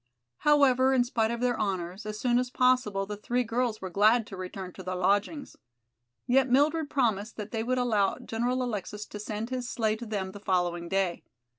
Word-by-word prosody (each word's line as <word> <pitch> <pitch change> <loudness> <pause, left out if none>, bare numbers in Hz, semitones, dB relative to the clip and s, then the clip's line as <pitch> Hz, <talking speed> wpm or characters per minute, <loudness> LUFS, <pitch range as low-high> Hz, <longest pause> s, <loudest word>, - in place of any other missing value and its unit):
However, 265 -3 +4
in 250 - +4
spite 230 -2 0
of 235 0 -3
their 245 -2 +1
honors, 190 0 -3
as 215 0 -5
soon 245 0 +2
as 250 0 -2
possible 250 -6 +2
the 210 +1 -5
three 240 +4 -1
girls 230 -1 -1
were 185 -1 -5
glad 215 +4 +4
to 195 - -9
return 185 0 -7
to - - -9
their 185 0 -4
lodgings. 205 - 0 0.7
Yet 260 +1 +3
Mildred 295 +4 +2
promised 220 -5 0
that 210 -1 -6
they 225 - -2
would 255 +3 0
allow 220 -6 +1
General 245 +3 -1
Alexis 210 -2 -4
to 210 - -9
send 215 +3 -5
his 250 -1 -3
sleigh 220 -3 0
to 235 +1 -8
them 195 -3 -3
the 205 - -10
following 175 -3 -1
day. 190 -3 0
220 Hz, 195 wpm, -28 LUFS, 195-250 Hz, 0.7 s, However